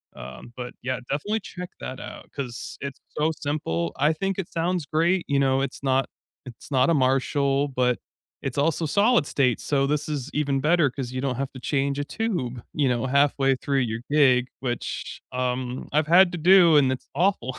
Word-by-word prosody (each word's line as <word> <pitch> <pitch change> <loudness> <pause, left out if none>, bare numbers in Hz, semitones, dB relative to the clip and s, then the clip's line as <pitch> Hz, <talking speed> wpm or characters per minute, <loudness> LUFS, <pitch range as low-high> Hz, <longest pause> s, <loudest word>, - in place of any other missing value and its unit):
Um, 65 - -10
but, 125 -1 -6
yeah, 130 0 -2
definitely 205 +11 -1
check 180 -1 -8
that 130 +1 -6
out - - -9
'cause 125 -4 -6
it's 140 -1 -6 0.2
so 155 +2 +2
simple, 85 - -2
I 150 +3 +3
think 195 +3 -2
it 180 - -3
sounds 170 -1 -1
great, 170 +5 +1
you 140 -1 +2
know, 135 0 +2
it's 140 0 -4
not 135 0 +2 0.4
it's 120 +3 -11
not 130 +2 +3
a - - +4
Marshall, 135 +1 +2
but 125 -2 +1 0.5
it's 135 0 -4
also 160 +2 +1
solid 200 - +3
state. 130 -6 +1
So 140 -1 0
this 150 +1 -1
is 145 -2 -3
even 140 -2 0
better 155 -3 +3
‘cause 125 -3 -5
you 130 - -4
don't 130 -3 -1
have 135 0 -3
to 130 - -9
change 140 +1 -1
a - - 0
tube, 145 - -3
you 145 -3 +1
know, 125 +1 0
halfway 140 0 +3
through 135 +1 -1
your 115 -2 -2
gig, 130 -4 +4
which, 120 -2 -4
um, 125 0 -2
I've 150 +1 +2
had 175 +2 +6
to - - -2
do, 170 -2 +6
and 135 -2 +4
it's 130 - -5
awful. 170 -9 0
140 Hz, 195 wpm, -25 LUFS, 130-155 Hz, 0.5 s, had